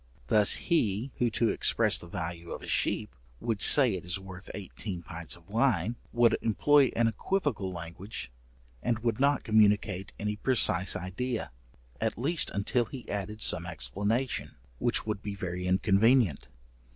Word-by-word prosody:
Thus 105 -2 +5
he 120 - 0
who 120 - +2
to 115 +1 +1
express - - +2
the 85 - -10
value 85 0 -6
of - - -8
a - - -9
sheep, - - -1 0.2
would 110 -4 -2
say 130 -7 +8
it 90 - -5
is 90 +2 -2
worth 95 0 -11
eighteen 95 -2 -6
pints 80 +1 -8
of 85 -1 -20
wine, 115 -1 +1 0.2
would 120 -1 +3
employ 140 +4 +3
an 115 0 +3
equivocal 125 - -2
language, 85 - -7 0.5
and 120 -1 0
would 115 0 -2
not 140 0 +2
communicate 105 -3 +2
any 105 0 -2
precise 105 -7 +3
idea, 110 +7 -4 0.5
at - - -1
least 155 +8 -1
until 110 +5 0
he 125 +2 -10
added 105 +2 -4
some 85 +1 0
explanation, 100 - -2 0.2
which - - +1
would 105 -2 -3
be 100 -1 -5
very 90 -1 -4
inconvenient. 100 - +2
105 Hz, 150 wpm, -29 LUFS, 90-120 Hz, 0.5 s, say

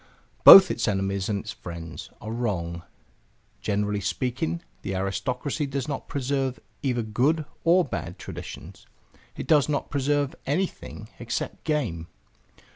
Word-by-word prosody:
Both 190 -2 +11
its 120 - -1
enemies 95 -1 -1
and 100 -2 -1
its 110 - -7
friends 85 -2 -8
are 110 - -6
wrong. 90 -8 -2 0.8
Generally 105 0 -1
speaking 100 -5 -2 0.2
the 95 - -4
aristocracy 125 +10 -2
does 135 -2 -3
not 140 -2 -4
preserve 135 -1 -1 0.2
either 125 -4 0
good 135 +9 +1 0.2
or 175 +2 +4
bad - - -5
traditions; - - -9 0.5
it - - -5
does 150 -2 +4
not 145 - -2
preserve 145 0 +1
anything 145 - -3
except 120 0 -4
game. 115 - -1
120 Hz, 125 wpm, -26 LUFS, 100-140 Hz, 0.8 s, Both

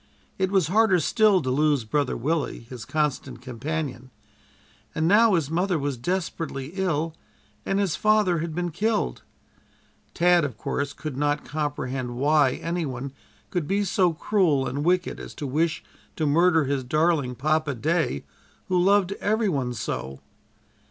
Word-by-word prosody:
It 190 0 +1
was 190 -3 +3
harder 195 +2 +3
still 200 +3 +3
to 130 - -1
lose 145 -1 +2
Brother 140 +5 -1
Willie, 150 +4 -1
his 115 -1 -9
constant 140 -4 -2
companion, 130 +1 -5 0.9
and 160 0 +1
now 210 +2 +5
his 155 -3 -1
mother 180 +1 +1
was 140 -2 -2
desperately 155 -1 -3
ill, 165 -4 -1 0.5
and 195 - +1
his 195 -5 +1
father 210 -5 +3
had 160 -1 -4
been 175 0 -2
killed. 215 +6 -1 0.9
Tad, 175 -1 +4
of 130 -7 -3
course, 140 +5 -3
could 150 -2 -6
not 145 +1 0
comprehend 135 -5 -3
why 145 0 +3
any 170 +1 -3
one 135 -1 -5 0.4
could 175 -5 -1
be 200 +2 +1
so 185 -2 +2
cruel 165 -5 +1
and 140 +4 -3
wicked 180 +2 +1
as - - -9
to 150 - -5
wish 160 +4 0 0.3
to 155 - -1
murder 165 +2 +4
his 140 -1 -1
darling 150 -1 +1
Papa 155 +1 0
day, 155 - 0 0.5
who 180 -1 +3
loved 200 -1 +3
every 215 +1 +1
one 135 -7 -1
so! 70 - -4
155 Hz, 150 wpm, -25 LUFS, 140-180 Hz, 0.9 s, now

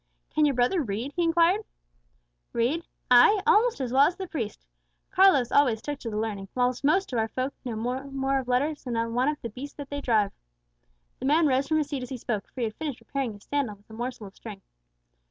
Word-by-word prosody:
"Can 305 - +4
your 280 - 0
brother 250 +9 +2
read?" 235 +3 -4
he 350 - 0
inquired. 340 +4 +3 0.9
"Read! 275 +9 0 0.2
ay, 250 - +7
almost 465 -2 +4
as 255 -2 -3
well 275 +2 +6
as 350 - -2
the 380 0 -5
priest. 235 - -5 0.5
Carlos 305 -11 +5
always 250 -6 +4
took 290 +3 -5
to 235 - -5
the 210 - -4
learning, 210 -3 -3
whilst 250 0 0
most 310 +2 +2
of 235 - +1
our 220 - +1
folk 255 +4 -3
know 245 -4 -4
no 250 +5 -3
more 270 0 -1
of 260 - -6
letters 285 +5 0
than 245 -3 -3 0.2
one 250 +3 +2
of 300 - -3
the 235 - -3
beasts 270 +6 -8
that 285 -1 -9
they 285 0 -3
drive." 215 -6 +2 0.9
The - - -5
man 310 +4 +4
rose 270 -1 +2
from 315 - +2
his 300 -2 0
seat 280 -3 -3
as 250 - -6
he 265 - -4
spoke, 220 -3 -3
for 255 - -8
he - - +1
had 220 -1 -2
finished 295 -6 -4
repairing 270 -5 -3
his 205 -1 -14
sandal 280 -7 -2
with 205 +2 -22
a - - -10
morsel 240 -1 -5
of 195 - -12
string. 205 -4 -10
260 Hz, 230 wpm, -27 LUFS, 235-295 Hz, 0.9 s, ay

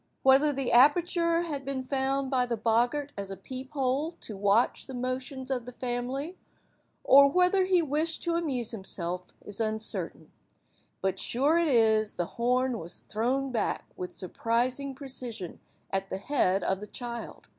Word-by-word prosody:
Whether 270 +3 +6
the 275 -2 -2
aperture 335 +6 +4
had 290 -5 -4
been 270 -1 -3
found 270 0 -1
by 250 -2 +2
the 235 -1 -1
boggart 240 +6 +1
as 200 -1 -5
a 195 - -6
peep–hole 265 - -2
to 215 - -5
watch 200 +4 +2
the 265 - -7
motions 260 +2 -4
of 250 -2 -2
the 250 - -7
family, 255 +7 -4 0.6
or 280 +1 +8
whether 365 +4 +3
he 365 -2 +3
wished 310 +2 -1
to 340 - 0
amuse 275 -9 -1
himself, 180 -4 -4 0.2
is 205 +2 -5
uncertain, 220 0 -2 0.7
but 190 0 0
sure 290 +7 +2
it 340 - +2
is 220 -5 +3
the 175 - -1 0.2
horn 250 0 +2
was 170 +3 -6
thrown 255 +5 -1
back 225 -4 -1
with 180 - -6
surprising 245 +8 -1
precision 250 - -5 0.3
at 195 0 -1
the - - -3
head 195 -4 +1
of 190 0 0
the 210 - -8
child. 235 0 -7
255 Hz, 155 wpm, -28 LUFS, 220-280 Hz, 0.7 s, or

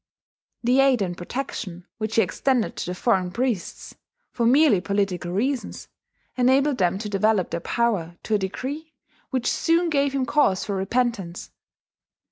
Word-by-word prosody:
The 250 +3 +3
aid 265 -5 +4
and 175 -2 -3
protection 180 -3 -5
which 215 0 -3
he 225 - +5
extended 245 +6 0
to - - -4
the 180 - -3
foreign 185 -3 +1
priests, 235 -1 -3 0.4
for 235 -1 0
merely 260 - +5
political 190 -3 -1
reasons, 250 +8 -2 0.5
enabled 260 +2 +3
them 180 0 +2
to 210 +1 -5
develop 205 -1 +1
their - - -2
power 175 -5 -1
to 220 - -2
a 210 - +3
degree 275 +11 -5 0.3
which 255 -3 -2
soon 335 +4 +2
gave 280 -2 +1
him 265 -2 +1
cause 245 -9 +2
for 200 - -2
repentance. 195 -3 -2
225 Hz, 150 wpm, -24 LUFS, 190-265 Hz, 0.5 s, he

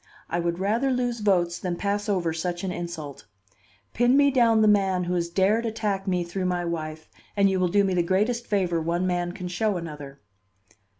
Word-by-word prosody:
I 175 - 0
would 170 0 -1
rather 220 +8 0
lose 245 -2 -1
votes 180 -5 +1
than 180 -2 -3
pass 205 +3 -2
over 175 -5 0
such 175 +2 -3
an 190 - -2
insult. 160 -9 -7 0.7
Pin 245 +3 +3
me 285 0 +5
down 230 -4 +4
the - - +5
man 195 -3 +3
who 180 +1 -2
has 170 -1 -1
dared 195 +6 +2
attack 215 -3 -2
me 180 -2 +1
through 185 +2 -4
my 180 -1 -1
wife, 155 -2 -5 0.3
and 200 -1 +4
you 190 - 0
will 180 - +2
do 200 +3 +3
me 190 -1 0
the 180 - +2
greatest 210 +7 0
favor 180 -5 0
one 170 +3 -1
man 175 -1 -1
can 180 0 -6
show 190 +3 -1
another." 145 -4 -8
185 Hz, 200 wpm, -25 LUFS, 170-210 Hz, 0.7 s, me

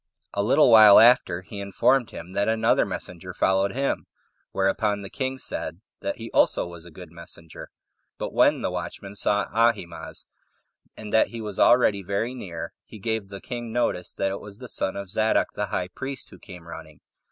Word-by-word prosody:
A 100 - 0
little 125 +5 +4
while 110 -2 +9
after, 115 -7 +4
he 100 +2 -9
informed 120 +6 +1
him 85 +2 -9
that 100 +1 0
another 110 0 +2
messenger 90 +1 -6
followed 95 +1 +1
him; 135 +2 -2 0.4
whereupon 100 +1 0
the 100 - -8
king 130 0 -3
said - - -5 0.2
that - - -4
he - - -8
also - - +3
was 85 -1 -10
a - - -11
good 80 - -12
messenger: 80 -1 -11 0.5
but - - -5
when - - +4
the - - -1
watchman 100 0 -6
saw 105 0 +2
Ahimaaz, 115 -6 -1 0.7
and 105 -1 -8
that 110 - +5
he 115 - -8
was 105 -3 -6
already 110 -5 +4
very 100 +6 -2
near, 90 -10 -7
he - - -12
gave 110 -1 -2
the 100 -1 -8
king 120 0 -6
notice 110 -6 -1
that 95 0 -1
it 100 - -5
was 100 -1 -11
the 125 - -9
son 95 - -2
of 100 -2 -6
Zadok 110 +1 +1
the - - -3
high 90 - -3
priest 130 +7 -6
who - - -14
came 90 -2 -12
running. 80 -3 -11
100 Hz, 185 wpm, -25 LUFS, 95-115 Hz, 0.7 s, while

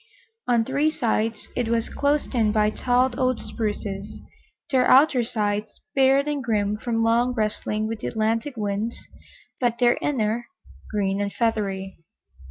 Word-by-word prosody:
On 235 -2 +3
three 280 +4 +1
sides 225 -6 -1
it 245 -2 0
was 230 0 0
closed 285 0 0
in 225 -4 +2
by 210 0 +2
tall 250 +3 +2
old 255 -1 +2
spruces, 205 -2 -4 0.5
their 255 -2 +3
outer 265 -2 +6
sides 210 -2 -2
bared 270 0 +4
and 290 -2 -2
grim 210 -3 0
from 225 +1 -1
long 240 +2 +2
wrestling 215 -1 -1
with 225 0 -4
the - - -4
Atlantic 230 +4 -1
winds, 210 +2 -2 0.6
but 240 -2 +1
their 240 -1 +3
inner 235 -4 -1 0.4
green 200 -1 0
and 200 0 -1
feathery. 195 -5 -2
230 Hz, 145 wpm, -24 LUFS, 210-255 Hz, 0.6 s, outer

